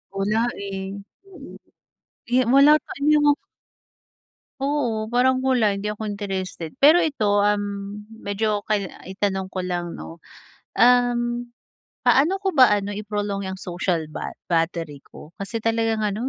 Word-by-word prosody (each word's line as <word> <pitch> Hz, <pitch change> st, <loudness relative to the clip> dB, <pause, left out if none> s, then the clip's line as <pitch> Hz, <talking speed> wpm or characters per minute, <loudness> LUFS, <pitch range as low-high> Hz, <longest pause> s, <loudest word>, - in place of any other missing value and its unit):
Wala 205 Hz, +3 st, 0 dB, 0.2 s
eh, 195 Hz, -1 st, -5 dB, 0.3 s
mm. 390 Hz, -1 st, -12 dB, 0.7 s
Eh, 255 Hz, +1 st, +3 dB
wala 280 Hz, +3 st, +7 dB
sa -, -, -13 dB
inyong 295 Hz, 0 st, +4 dB, 1.2 s
Oo, 265 Hz, -6 st, -1 dB
parang 255 Hz, +1 st, +3 dB
mula 250 Hz, -6 st, +2 dB
hindi 200 Hz, -, -6 dB
ako 215 Hz, 0 st, -5 dB
interested, 190 Hz, -5 st, -5 dB
pero 305 Hz, +5 st, +8 dB
ito 210 Hz, -11 st, +2 dB
um, 205 Hz, 0 st, -2 dB
medyo 210 Hz, -1 st, -2 dB
kail 205 Hz, -3 st, -1 dB, 0.2 s
itanong 190 Hz, 0 st, -3 dB
ko 185 Hz, -, -2 dB
lang 175 Hz, -1 st, -3 dB
'no, 165 Hz, -, -9 dB, 0.6 s
um, 245 Hz, 0 st, +4 dB, 0.8 s
paano 290 Hz, +7 st, +4 dB
ko 385 Hz, -2 st, -1 dB
ba 255 Hz, -6 st, +6 dB
ano, 205 Hz, 0 st, -3 dB
i-prolong 205 Hz, -1 st, -3 dB
'yang 190 Hz, -, -5 dB
social 175 Hz, -2 st, -2 dB
ba -, -, -5 dB, 0.2 s
battery 165 Hz, -3 st, -1 dB
ko? 155 Hz, -, -14 dB
Kasi 225 Hz, +3 st, -4 dB
talagang 225 Hz, -1 st, +1 dB
ano 210 Hz, +5 st, -1 dB
210 Hz, 135 wpm, -23 LUFS, 195-245 Hz, 1.2 s, pero